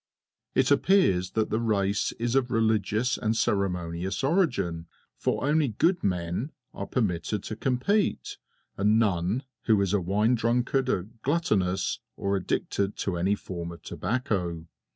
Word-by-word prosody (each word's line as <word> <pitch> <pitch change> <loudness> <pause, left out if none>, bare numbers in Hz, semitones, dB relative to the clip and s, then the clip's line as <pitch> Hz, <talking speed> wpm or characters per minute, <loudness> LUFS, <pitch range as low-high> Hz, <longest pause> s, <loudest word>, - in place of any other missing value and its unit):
It - - +3
appears 95 - +3
that 110 -1 0
the 110 - +1
race 100 -3 +1
is 120 +1 -2
of 130 -2 +2
religious 110 +1 +1
and 110 +1 0
ceremonious 90 -2 -1
origin, 100 - +1 0.3
for - - -1
only 150 0 +3
"good 165 - +1
men" 90 - -1 0.2
are - - -5
permitted 105 -3 -1
to 110 - -5
compete, 135 - 0 0.4
and 105 +2 +3
none 100 +2 +1 0.2
who 110 -2 +4
is 100 -1 +1
a 100 - +2
wine 105 +7 +2
drunkard, 125 +3 +1
a 90 - +1 0.2
gluttonous, 105 - 0 0.2
or 100 0 0
addicted 100 +2 -1
to 95 - -2
any 95 +4 +1
form 85 -4 -6
of 85 - -12
tobacco. 95 - -2
105 Hz, 140 wpm, -27 LUFS, 90-125 Hz, 0.4 s, who